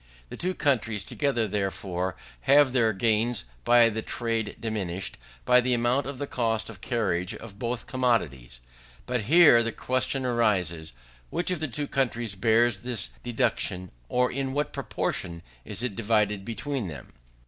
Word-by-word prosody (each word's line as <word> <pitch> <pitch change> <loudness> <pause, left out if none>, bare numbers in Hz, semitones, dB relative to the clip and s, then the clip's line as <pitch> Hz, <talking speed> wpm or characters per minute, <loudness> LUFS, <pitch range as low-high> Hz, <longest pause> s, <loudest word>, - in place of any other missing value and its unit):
The - - -7
two 185 +1 -2
countries 115 -7 +1
together, 125 -3 0
therefore, 95 -2 -2 0.3
have 140 -2 +6
their 115 -4 +4
gains 110 - +1 0.2
by 120 - +6
the 110 0 -3
trade 115 -2 -2
diminished, 95 -5 -3 0.3
by 125 0 +6
the 125 0 +1
amount 120 +3 +1
of 140 -1 -5
the 145 - -3
cost 115 -4 -1
of 100 -3 -14
carriage 95 -7 -1
of 105 -3 -11
both 120 +1 -3
commodities. 70 - -1 0.4
But 125 -4 -1
here 150 -3 +7
the 115 0 -1
question 130 +3 -1
arises, 95 -10 0 0.4
which 180 - 0
of 180 - -1
the 155 - -1
two 145 +4 -3
countries 120 -6 -1
bears 110 +2 +3
this 120 -2 -3
deduction, 115 -7 -1 0.2
or 125 0 +2
in 135 0 -2
what 145 +1 -1
proportion 85 -1 -3 0.2
it - - -5
is 125 - +1
divided 105 -1 +1
between 115 +2 -3
them. 75 -6 -9
115 Hz, 155 wpm, -27 LUFS, 100-125 Hz, 0.4 s, here